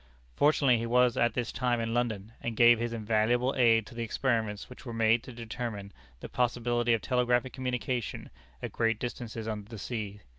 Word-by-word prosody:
Fortunately 140 -5 +4
he 115 - -3
was 125 0 +3
at 120 0 +1
this 120 -2 -2
time 125 -2 0
in 115 0 -2
London, 110 -4 -1
and 115 -2 -4
gave 120 -1 +7
his 120 0 -2
invaluable 115 +3 +1
aid 115 -4 +4
to 100 - -12
the 120 - -5
experiments 115 -3 -1
which 125 - -13
were 120 -3 -6
made 115 +1 +3
to 130 - -10
determine 115 -3 -6 0.3
the - - -6
possibility 120 -1 +1
of 110 - -4
telegraphic 125 0 +1
communication 125 -2 -3 0.3
at - - -4
great 115 -1 +1
distances 115 -2 -5
under 105 -1 -5
the 115 - -8
sea. 105 -2 -5
120 Hz, 185 wpm, -29 LUFS, 110-125 Hz, 0.3 s, gave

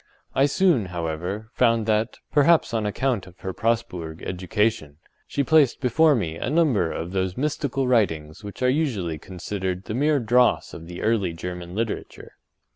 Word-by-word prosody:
I 135 +1 +4
soon, 160 - +2
however, 90 +5 -4
found 115 -3 +2
that, 110 0 0
perhaps 150 -1 +4
on 110 -2 0
account 115 -3 -1
of 90 -1 -17
her 95 - -4
Presburg 90 -8 -2
education, 90 -4 -1 0.3
she 140 - -1
placed 150 -3 +4
before 145 +4 +4
me 85 -8 -2
a - - -3
number 140 - +2
of 85 +2 -5
those 95 -1 -1
mystical 140 -2 -1
writings 80 -9 0
which 105 +4 -7
are - - +4
usually 115 - 0
considered 95 +1 -4
the 105 - -5
mere 145 +4 +2
dross 120 +1 +2
of 80 - -9
the 90 0 -7
early 105 -6 +1
German 90 +1 -6
literature. 110 0 -4
105 Hz, 160 wpm, -24 LUFS, 90-130 Hz, 0.3 s, I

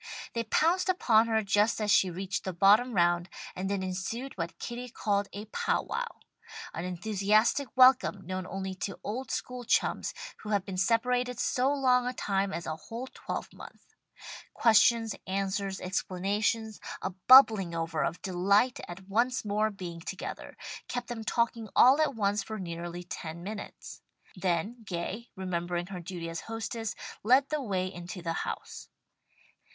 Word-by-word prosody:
They 230 0 -2
pounced 350 - +2
upon 230 -11 +4
her 220 -1 +1
just 205 +3 +2
as 210 -1 +1
she 190 - +5
reached 190 +2 -3
the 190 - -3
bottom 210 +7 +5
round, 175 0 +2 0.3
and 190 +1 -3
then 200 -1 -1
ensued 195 +8 -4
what 170 -2 -4
Kitty 245 +1 -6
called 205 -3 0
a 205 +2 -7
pow 220 - 0
wow 485 -1 -5 0.5
an 165 - -4
enthusiastic 210 +8 +2
welcome 255 -6 +5
known 185 0 -4
only 190 0 -4
to 195 -2 -4
old 250 +6 -4
school 250 0 -4
chums - - +1 0.2
who 215 - -8
have 200 -3 +1
been 190 -1 -5
separated 245 +4 +1
so 255 +2 +2
long 255 -3 +3
a 250 - -1
time 195 -2 0
as 170 - -4
a 155 - -3
whole 230 +9 -7
twelvemonth. - - -8 0.6
Questions, 225 -1 +4
answers, 195 0 -2
explanations, 205 +4 -1 0.2
a 190 - -1 0.2
bubbling 220 -10 +8
over 165 -1 -1
of 175 - -3
delight 200 +6 +2
at 185 +2 -9
once 235 +5 +1
more 210 +1 +1
being 180 -5 -7
together, 185 +3 -7 0.3
kept 245 0 -4
them 230 -2 -4
talking 230 -1 0
all 265 +5 +7
at 300 -4 +1
once 205 -1 +1
for 220 +2 -6
nearly 175 -1 -5
ten 170 -1 -7
minutes. 210 +2 -8 0.3
Then 185 +6 -1
Gay, 195 +4 -5
remembering 175 -2 -2
her 180 - -4
duty 175 -1 -6
as 165 0 -5
hostess 225 -1 -4 0.3
led 260 +5 +4
the 305 -1 -1
way 190 -7 -1
into 180 -1 -7
the 165 -1 -1
house. - - -5
205 Hz, 155 wpm, -29 LUFS, 185-235 Hz, 0.6 s, bubbling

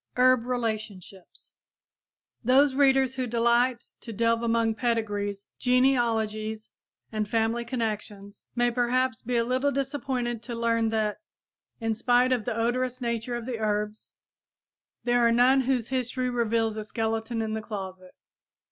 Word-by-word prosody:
HERB 250 -1 +4
RELATIONSHIPS 215 -6 -5 0.9
Those 265 +3 +4
readers 270 -2 +3
who 260 -1 -2
delight 235 +1 +1
to 230 - -9
delve 230 +1 +1
among 230 -1 +1
pedigrees, 205 -4 -2
genealogies 225 -4 +1 0.4
and 215 -2 -2
family 225 +1 +1
connections, 210 -4 -5
may 240 0 +2
perhaps 250 +1 0
be 245 +1 -3
a 230 - +3
little 255 +4 +1
disappointed 265 -4 -2
to 235 0 -6
learn 230 -1 +1
that, 215 -2 -1 0.6
in 225 -1 0
spite 245 +3 +2
of 245 -4 0
the 235 -2 -2
odorous 250 +2 0
nature 235 0 -2
of 240 -1 -5
the 240 -3 -4
herbs, 210 0 -2 0.9
there 245 0 +2
are 235 - +5
none 250 +3 +5
whose 255 -3 0
history 255 0 -1
reveals 225 -2 0
a 215 - -3
skeleton 225 +2 -2
in 220 -1 -2
the 220 - -2
closet. 190 -4 -7
235 Hz, 140 wpm, -27 LUFS, 220-250 Hz, 0.9 s, are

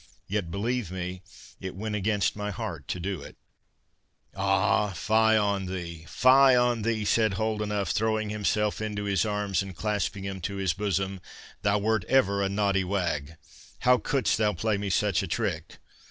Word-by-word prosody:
Yet, 100 -3 -2
believe 110 +3 -2
me, 90 0 -5 0.4
it 95 -1 -6
went 105 +2 -4
against 105 -2 0
my 105 0 -3
heart 95 - -5
to 90 - -3
do 95 +1 -3
it." - - -11 1.0
"Ah, 100 +1 +2
fie 110 +5 +3
on 100 -2 0
thee, 85 -3 -6
fie 130 +1 +6
on 120 -2 +2
thee," 110 -1 -1
said 110 0 +2
Holdenough, 105 -1 -1
throwing 110 -1 0
himself 105 +1 0
into 105 -1 -3
his 100 0 +1
arms, 105 -4 0
and 95 -2 -7
clasping 105 0 -2
him 95 -1 -5
to 100 +3 -3
his 95 -4 0
bosom, 95 -1 -2 0.4
"thou 100 +1 +2
wert 110 0 +1
ever 100 -6 +3
a 100 - +1
naughty 100 -1 +1
wag. 85 -6 -2 0.5
How 125 0 +5
couldst 135 -5 0
thou 105 -1 +2
play 110 +5 0
me 100 -1 -3
such 100 -2 +2
a - - -4
trick? - - -3
100 Hz, 170 wpm, -27 LUFS, 95-110 Hz, 1.0 s, fie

